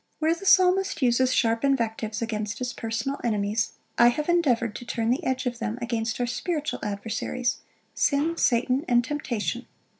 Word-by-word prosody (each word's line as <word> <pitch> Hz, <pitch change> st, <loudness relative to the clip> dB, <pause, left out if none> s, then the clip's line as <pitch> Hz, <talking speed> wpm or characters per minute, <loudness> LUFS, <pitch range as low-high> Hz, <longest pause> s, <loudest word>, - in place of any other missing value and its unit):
"Where 320 Hz, +1 st, +2 dB
the 375 Hz, +4 st, -6 dB
Psalmist 370 Hz, -4 st, +4 dB
uses 255 Hz, +1 st, +3 dB
sharp 230 Hz, -1 st, +1 dB
invectives 225 Hz, -4 st, 0 dB
against 215 Hz, -2 st, -3 dB
his 250 Hz, -1 st, -3 dB
personal 225 Hz, +5 st, -3 dB
enemies, 215 Hz, -1 st, 0 dB, 0.3 s
I 235 Hz, -, +8 dB
have 300 Hz, +5 st, +1 dB
endeavoured 250 Hz, -11 st, +2 dB
to -, -, -9 dB
turn 230 Hz, -1 st, -1 dB
the 255 Hz, -, 0 dB
edge 260 Hz, 0 st, -1 dB
of 240 Hz, -1 st, -2 dB
them 230 Hz, 0 st, -3 dB
against 235 Hz, -2 st, -2 dB
our 245 Hz, -, +1 dB
spiritual 300 Hz, +5 st, -2 dB
adversaries, 225 Hz, +4 st, -2 dB, 0.3 s
sin, 300 Hz, +4 st, +1 dB
Satan, 255 Hz, 0 st, +2 dB
and 240 Hz, -1 st, +4 dB
temptation. 250 Hz, -4 st, -3 dB
240 Hz, 160 wpm, -26 LUFS, 225-280 Hz, 0.3 s, I